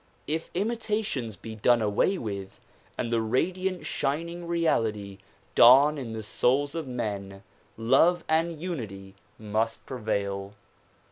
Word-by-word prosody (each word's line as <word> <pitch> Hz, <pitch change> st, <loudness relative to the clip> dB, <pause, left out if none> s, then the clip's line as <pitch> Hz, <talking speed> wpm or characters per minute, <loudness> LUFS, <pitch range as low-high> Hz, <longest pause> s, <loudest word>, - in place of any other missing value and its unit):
If 160 Hz, +2 st, -3 dB
imitations 210 Hz, -, -2 dB
be 110 Hz, +2 st, -9 dB
done 120 Hz, +3 st, +3 dB
away 110 Hz, -, +1 dB
with 100 Hz, -, -6 dB, 0.4 s
and 115 Hz, -, -2 dB
the 115 Hz, -, +2 dB
radiant 180 Hz, +11 st, -1 dB
shining 170 Hz, +5 st, -2 dB
reality 110 Hz, -, 0 dB, 0.3 s
dawn 140 Hz, +5 st, +7 dB
in 115 Hz, -4 st, -5 dB
the 110 Hz, 0 st, -5 dB
souls 135 Hz, +6 st, +1 dB
of 165 Hz, -4 st, -4 dB
men 100 Hz, -5 st, -4 dB, 0.3 s
love 145 Hz, +10 st, +4 dB
and 160 Hz, 0 st, +1 dB
unity 105 Hz, -, -6 dB, 0.2 s
must 110 Hz, +1 st, -2 dB
prevail. 100 Hz, -4 st, -3 dB
125 Hz, 120 wpm, -27 LUFS, 105-165 Hz, 0.4 s, dawn